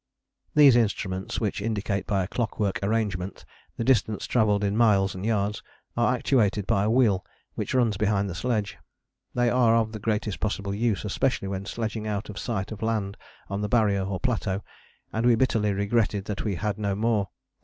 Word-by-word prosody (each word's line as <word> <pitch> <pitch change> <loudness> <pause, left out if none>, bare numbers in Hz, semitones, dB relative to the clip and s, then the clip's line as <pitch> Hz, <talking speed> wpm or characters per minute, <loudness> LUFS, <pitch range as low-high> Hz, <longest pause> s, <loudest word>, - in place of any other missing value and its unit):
These 145 -4 +8
instruments, 100 -5 0
which 105 -2 -2
indicate 105 -2 -2
by 95 -2 +1
a - - -4
clockwork 105 -3 -1
arrangement 100 -3 -2 0.3
the - - -1
distance 115 -4 +2
travelled 105 -4 +2
in 100 0 0
miles 100 -4 +3
and 95 - -7
yards, 105 -1 0 0.3
are 120 +2 +2
actuated 110 -6 +1
by 105 -3 +2
a 105 - +1
wheel 110 -6 +3 0.3
which - - -3
runs 115 -6 +2
behind 100 -1 +1
the 90 - -4
sledge. 105 +2 -2 0.6
They 120 0 +2
are 120 -2 +4
of 110 -1 +1
the 110 - -6
greatest 105 -1 -1
possible 100 -2 -2
use, 110 0 0
especially 105 -1 0
when 100 0 -4
sledging 110 -1 -3
out 105 0 -3
of 100 - -7
sight 110 -6 -3
of 110 - -7
land 110 -3 -1 0.3
on 100 +1 -3
the 105 - -2
Barrier 105 -4 +2
or 95 -1 -3
Plateau, 105 -7 -1 0.5
and 110 - -1
we 120 -1 +5
bitterly 110 -4 +1
regretted 100 0 0
that 105 -2 -3
we 105 -4 -1
had 105 +2 -2
no 100 -2 0
more. 105 -2 +1
105 Hz, 185 wpm, -26 LUFS, 100-115 Hz, 0.6 s, These